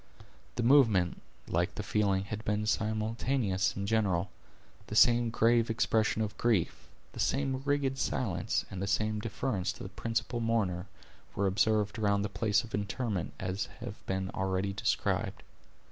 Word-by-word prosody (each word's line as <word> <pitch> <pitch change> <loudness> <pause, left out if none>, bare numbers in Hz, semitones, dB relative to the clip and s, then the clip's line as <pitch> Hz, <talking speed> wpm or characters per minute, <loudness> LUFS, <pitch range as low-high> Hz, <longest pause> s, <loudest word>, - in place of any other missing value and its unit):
The 120 - -1
movement, 115 -9 +4 0.3
like - - 0
the - - -4
feeling, 100 -2 +1
had 105 +2 -6
been 105 0 0
simultaneous 110 -1 0
and 100 0 -3
general. 100 -4 +1 0.6
The - - -5
same 120 -1 +5
grave 115 +1 +3
expression 110 -1 +1
of 105 -1 -4
grief, 110 -8 0 0.2
the - - -9
same 135 -1 0
rigid 140 -2 0
silence, 90 -9 -1
and 95 - -5
the 100 - -1
same 105 +1 0
deference 105 -3 -2
to - - -10
the 95 - -6
principal 115 +4 -2
mourner, 105 -5 0 0.5
were 100 - +1
observed 105 +2 +1
around 100 -1 +2
the 105 - -2
place 105 +1 +1
of 115 - -12
interment 105 -2 -2
as 95 +1 -2
have - - -8
been 95 0 -2
already 95 +1 -1
described. 100 - -1
105 Hz, 150 wpm, -31 LUFS, 95-115 Hz, 0.6 s, same